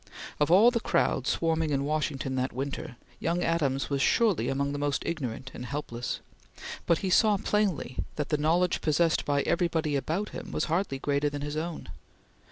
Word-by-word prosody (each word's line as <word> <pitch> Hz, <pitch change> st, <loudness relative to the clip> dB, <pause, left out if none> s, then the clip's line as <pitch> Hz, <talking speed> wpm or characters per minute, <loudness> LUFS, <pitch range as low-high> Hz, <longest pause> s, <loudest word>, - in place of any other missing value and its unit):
Of 150 Hz, -, +2 dB
all 205 Hz, +8 st, +7 dB
the 235 Hz, -, 0 dB
crowd -, -, +1 dB
swarming 165 Hz, -1 st, +1 dB
in 140 Hz, -1 st, 0 dB
Washington 145 Hz, -3 st, -1 dB
that 130 Hz, 0 st, -1 dB
winter, 135 Hz, -1 st, -4 dB, 0.2 s
young 170 Hz, +1 st, 0 dB
Adams 145 Hz, -5 st, 0 dB
was 140 Hz, -1 st, +1 dB
surely 220 Hz, -1 st, +3 dB
among 140 Hz, +1 st, 0 dB
the 145 Hz, -, -3 dB
most 145 Hz, -1 st, 0 dB
ignorant 135 Hz, -5 st, -4 dB
and -, -, -7 dB
helpless, 125 Hz, -3 st, -4 dB, 0.7 s
but 170 Hz, -, +4 dB
he 185 Hz, -, 0 dB
saw 210 Hz, +1 st, +5 dB
plainly 195 Hz, -10 st, -1 dB, 0.2 s
that 150 Hz, -1 st, -3 dB
the 150 Hz, -, +2 dB
knowledge 170 Hz, +4 st, +2 dB
possessed 160 Hz, +1 st, +2 dB
by 140 Hz, -1 st, +1 dB
everybody 165 Hz, -4 st, +1 dB
about 165 Hz, +9 st, -1 dB
him -, -, -7 dB
was -, -, -1 dB
hardly 165 Hz, -3 st, 0 dB
greater 145 Hz, +2 st, 0 dB
than 145 Hz, 0 st, -5 dB
his 145 Hz, +1 st, -4 dB
own. 160 Hz, +1 st, -4 dB
150 Hz, 175 wpm, -28 LUFS, 140-170 Hz, 0.7 s, all